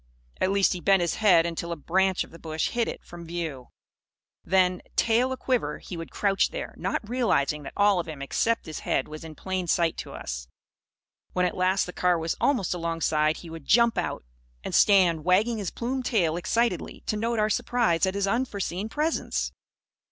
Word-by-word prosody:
At 185 - +1
least 200 0 +3
he 180 - -5
bent 195 +1 +4
his 170 -2 0
head 175 -6 +6
until 170 0 -3
a - - -1
branch 190 +4 +1
of - - -15
the 165 - -13
bush 160 -1 -2
hid 235 -1 0
it - - -6
from 170 -1 -10
view. 160 -7 -4 0.8
Then, 185 0 +2
tail 235 +3 +3
a 260 - -2
quiver, 240 - -1
he 180 - -8
would 165 -1 -6
crouch 195 -1 +1
there; - - -6
not 210 - -3
realising 205 - +1
that 140 - -8
all 205 -2 +4
of 170 - -3
him 155 -3 -7
except 225 +11 0
his 155 - -6
head 135 - -1
was 155 +1 -8
in 160 -1 -9
plain 185 +2 -3
sight 170 -1 +1
to - - -6
us. - - -6 0.9
When 180 0 +2
at 180 - -1
last 185 +1 +2
the 180 - -8
car 180 -1 +2
was 165 0 -2
almost 245 -12 +2
alongside, 165 -2 0
he 170 - -10
would 165 -3 -9
jump 235 +1 +5
out; - - -3 0.4
and - - -5
stand 180 -6 +5
wagging 210 +6 +2
his 200 - -2
plumed 255 +2 -3
tail 175 -10 +2
excitedly, 205 +2 -1
to - - -1
note 230 +2 -1
our 215 0 +2
surprise 215 -9 +1
at 190 - -2
his 200 0 +1
unforeseen 205 -3 -2
presence. 305 +6 -1
185 Hz, 195 wpm, -26 LUFS, 165-215 Hz, 0.9 s, head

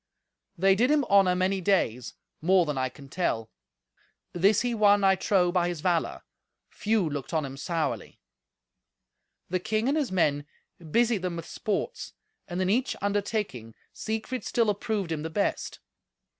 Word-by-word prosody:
They 195 +3 +5
did 235 +7 +2
him 300 -1 +3
honour 195 -2 +5
many 190 +1 0
days: 145 - 0 0.3
more 180 +2 +4
than 150 -2 -2
I 130 -1 -1
can 140 +2 -14
tell. 115 -9 -2 0.8
This 190 +4 +3
he 245 -1 -1
won, 205 -2 +4
I 195 0 +6
trow, 185 -2 +2
by 175 -1 +1
his 175 -3 -4
valour. 175 -2 0 0.5
Few 215 -4 0
looked 145 0 -4
on 155 -2 +1
him 135 0 -7
sourly. 165 +3 -3 1.3
The 185 - +1
king 215 +5 -1
and 280 - +2
his 295 -8 0
men 145 -5 +1 0.4
busied 230 +2 +2
them 180 -2 -3
with 165 -1 -6
sports, 210 - -3 0.3
and 175 0 -4
in - - 0
each 245 +7 +1
undertaking 200 - -2 0.2
Siegfried 220 +3 -4
still 230 -3 +1
approved 205 -4 -3
him 155 -2 -2
the 160 - -4
best. 200 +5 -2
185 Hz, 155 wpm, -27 LUFS, 160-210 Hz, 1.3 s, I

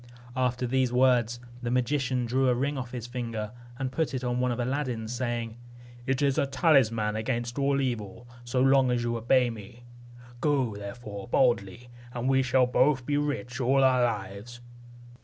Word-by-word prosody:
After 125 0 0
these 130 0 +1
words 125 -2 +3 0.2
the 120 - -3
magician 125 0 0
drew 130 +2 +2
a 125 - +3
ring 140 +4 -1
off 130 -2 -5
his 120 -3 -5
finger, 115 -3 -4 0.3
and 130 -1 -3
put 150 0 -1
it 130 - -3
on 125 0 -1
one 125 0 +1
of 120 - -3
Aladdin's, 125 -3 -2
saying, 120 -2 -3 0.5
"It 135 +1 +1
is 140 -1 +2
a 140 - +1
talisman 130 -8 +2
against 120 +2 -2
all 140 0 +2
evil, 115 -3 -3 0.2
so 120 +1 -1
long 135 -1 +4
as 120 -1 0
you 120 0 -1
obey 120 +2 +2
me. 115 +2 -11 0.6
Go, 135 -6 +1
therefore, 100 0 -8
boldly, 120 -2 +1 0.2
and 125 +1 -3
we 135 0 +4
shall 130 0 +3
both 130 +1 +2
be 145 - 0
rich 140 -3 -2
all 135 +2 +3
our 130 -1 +4
lives." 105 +1 -4
125 Hz, 175 wpm, -28 LUFS, 120-130 Hz, 0.6 s, long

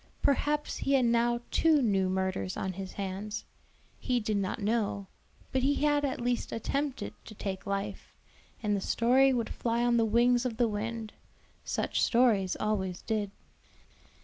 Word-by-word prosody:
Perhaps 295 +2 +1
he 275 - 0
had 260 -2 +4
now 235 0 +2
two 320 -2 +4
new 195 -7 +2
murders 185 - -1
on 190 -1 -2
his 190 0 -7
hands; 200 +2 -4 0.5
he 250 -2 0
did 215 -1 -1
not 195 -2 -1
know, 210 -2 0 0.5
but 260 - +1
he 280 +2 +2
had 290 0 +2
at 270 -2 -1
least 245 0 -1
attempted 260 - -2
to 215 - -11
take 195 -1 -5
life, 200 0 -4 0.5
and 210 -1 +1
the 200 - -2
story 255 +6 +4
would 235 -3 -1
fly 235 0 0
on 240 -1 +3
the 230 - +4
wings 240 +2 +3
of 240 -3 -3
the 240 -1 +3
wind; 220 +1 -4 0.5
such - - -1
stories 225 -6 +3
always 190 -4 -1
did. 215 -3 -1
230 Hz, 160 wpm, -30 LUFS, 200-250 Hz, 0.5 s, had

